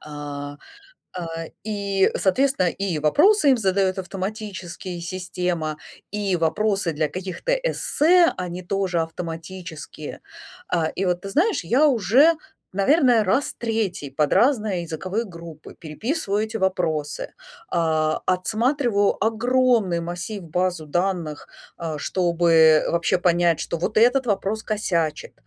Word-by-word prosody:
А, 145 -1 -7 0.6
а, 175 -2 -4 0.4
и, 200 -2 +1
соответственно, 255 -1 +2
и 195 -2 -2
вопросы 295 - +4
им 255 - +3
задает 190 -2 +1
автоматические 190 -1 -6
система, 175 -3 -3 0.3
и 205 -2 -1
вопросы 190 +3 0
для 155 0 0
каких-то 190 - -3
эссе 360 -8 +3
они 180 0 -5
тоже 185 -1 -1
автоматические. 165 -2 -7 0.5
А, 165 -3 +1
и 195 - -1
вот 180 -1 0
ты 195 - -6
знаешь, 340 - +1
я 250 - +3
уже, 255 - +5 0.4
наверное, 240 - +4
раз 255 +9 0
3 215 - -2
под 150 +2 +1
разные 215 -8 +2
языковые 185 +7 -3
группы 170 -4 -11
переписываю 210 - -2
эти 220 +1 -5
вопросы, 160 -6 -1 0.4
а, 155 -2 +1
отсматриваю 215 +3 +1
огромный 230 -4 +2
массив, 180 +5 -5
базу 175 -1 -2
данных, 175 -2 -2 0.3
а, 160 -3 -4
чтобы 165 -3 +4
вообще 170 +2 +1
понять, 175 -2 +2
что 170 - -3
вот 185 +6 -3
этот 245 +4 +4
вопрос 210 0 -1
косячит, 170 -7 -1
185 Hz, 120 wpm, -23 LUFS, 170-220 Hz, 0.6 s, уже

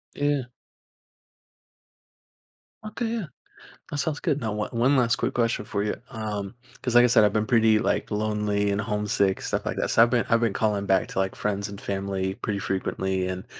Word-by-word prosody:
Yeah. 145 -3 0 2.4
Okay, 220 +2 -3
yeah. 225 -4 -2 0.7
That 145 - -3
sounds 150 0 -1
good. 145 0 0
Now, 110 -3 -2
o 105 - -1
one 125 +4 +3
last 120 -2 +3
quick - - -2
question 115 -3 0
for 100 0 -2
you, 105 - -1
um 105 -1 -5 0.3
'cause, 125 -2 -2
like 120 0 +8
I - - +7
said, 115 - +5
I've 105 0 +3
been 110 - +2
pretty, 110 -2 +4
like, - - -1
lonely 105 -1 0
and 100 - 0
homesick, 105 -2 0
stuff - - -2
like - - -2
that. - - -1
So, - - +5
I've 120 - +6
been 120 -1 +2
I've 115 0 +4
been 115 -4 +1
calling 105 -2 0
back 95 -1 +2
to, - - -5
like, 95 0 0
friends 100 -1 -2
and 100 0 -8
family 95 -1 -2
pretty 105 -3 -3
frequently, 95 -1 -2
and, 95 0 -4
105 Hz, 195 wpm, -25 LUFS, 100-120 Hz, 2.4 s, like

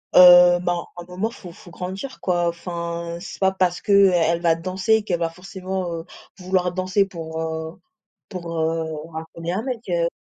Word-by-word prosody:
Heu, 175 -1 +9
bah, 175 -1 -1
un 175 - -6
moment 180 +5 -3
faut 200 -7 -11
faut 175 +1 -15
grandir 190 +10 -6
quoi, 175 -2 +1
enfin 170 0 -5
c'est - - -9
pas 190 -1 +3
parce 185 -2 0
que, - - -2
heu, 200 -1 +7
elle 170 0 +2
va 165 -2 +3
danser 190 +6 0
qu'elle 175 -5 -1
va 165 -1 0
forcément, 185 +1 -5
heu, 165 0 -6 0.3
vouloir 180 -1 0
danser 185 +2 +1
pour, 160 -4 -7
heu, 160 0 -5 0.5
pour, 170 -4 -5
heu, 160 0 0 0.3
racoler 165 +2 -6
un 200 - -1
mec, 250 -2 -4
heu. 170 -1 +1
175 Hz, 180 wpm, -22 LUFS, 170-190 Hz, 0.5 s, Heu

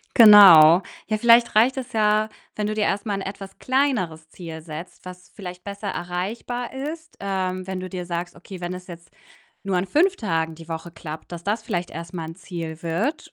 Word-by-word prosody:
Genau. 190 -6 +9 0.2
Ja, 215 0 0
vielleicht 235 0 +5
reicht 240 +5 +4
es 260 0 -5
ja, 215 0 +2 0.3
wenn 210 0 -2
du 215 - -2
dir 215 - -1
erst 205 +2 -1
mal 200 - 0
'n - - -4
etwas 195 0 -8
kleineres 215 - -1
Ziel 165 -3 -9
setzt, 160 +2 -9
was 180 0 -11
vielleicht 180 -3 -9
besser 200 0 -6
erreichbar 195 +8 -4
ist, 310 +4 -7
ähm, 185 -2 -2
wenn 190 -1 -4
du 185 - -6
dir 180 -1 -5
sagst, 175 0 -4
okay, 180 +1 -11
wenn 175 +1 -4
es 180 0 -10
jetzt 170 -2 -12 0.6
nur 195 -2 0
an 180 - +1
5 365 - +2
Tagen 165 -6 -2
die 165 +1 -13
Woche 165 +1 -6
klappt, 160 -1 -9
dass 170 0 -7
das 210 +2 -1
vielleicht 175 -3 -3
erst 165 +2 -8
mal 165 -2 -4
'n 165 - -8
Ziel 165 -4 -7
wird 200 - -2
185 Hz, 205 wpm, -23 LUFS, 170-215 Hz, 0.6 s, Genau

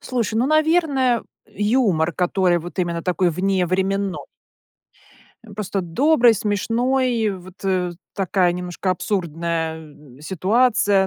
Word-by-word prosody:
Слушай, 235 -4 -2
ну, 245 +4 +2
наверно, 310 -6 +2 0.2
юмор, 205 -7 +1
который 180 -1 +1
вот 175 +3 -10
именно 170 -2 -1
такой 180 0 +1
вневременно 190 +2 0 1.3
Э, 215 - -13
просто 200 -1 -3
добрый, 240 - +3
смешной, 230 +3 0
вот, 185 0 -10
э, 180 -2 0 0.2
такая 185 -2 +1
немножко 180 +1 -3
абсурдная, 170 -4 -2
м, 150 -4 -15
ситуация. 200 +2 +2
190 Hz, 110 wpm, -21 LUFS, 175-230 Hz, 1.3 s, добрый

